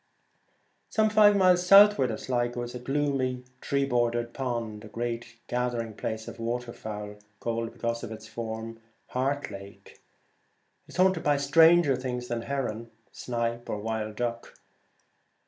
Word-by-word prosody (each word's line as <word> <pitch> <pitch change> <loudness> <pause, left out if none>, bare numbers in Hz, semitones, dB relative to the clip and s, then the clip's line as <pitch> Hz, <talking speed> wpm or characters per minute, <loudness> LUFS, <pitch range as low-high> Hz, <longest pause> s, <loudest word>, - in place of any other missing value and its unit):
Some 215 -1 +2
five 210 -1 +6
miles 180 -2 +5
southward 195 -7 +7
of 110 - -3
Sligo 120 -1 -1
is 120 - -7
a 125 - -5
gloomy 135 0 0
and 125 0 -17
tree 140 0 0
bordered 120 -2 0
pond, 115 -5 -3
a - - -9
great 115 +1 -4
gathering 120 -2 -2
place 110 +1 -4
of - - -9
water 120 +1 -3
fowl, 105 -1 -7 0.2
called, 115 0 -2
be - - -20
cause 115 0 -2
of 115 - -6
its 110 0 -8
form, 115 0 -6 0.3
the - - -23
Heart 140 +2 -1
Lake. 100 0 -11 0.9
It - - -14
is - - -11
haunted 185 -2 +3
by 145 -1 +2
stranger 160 +1 +5
things 125 -1 -4
than 120 -1 -2
heron, 115 -4 -3 0.2
snipe, 120 -1 -3
or - - -2
wild 110 0 -3
duck. 115 0 -4
120 Hz, 160 wpm, -28 LUFS, 115-140 Hz, 0.9 s, southward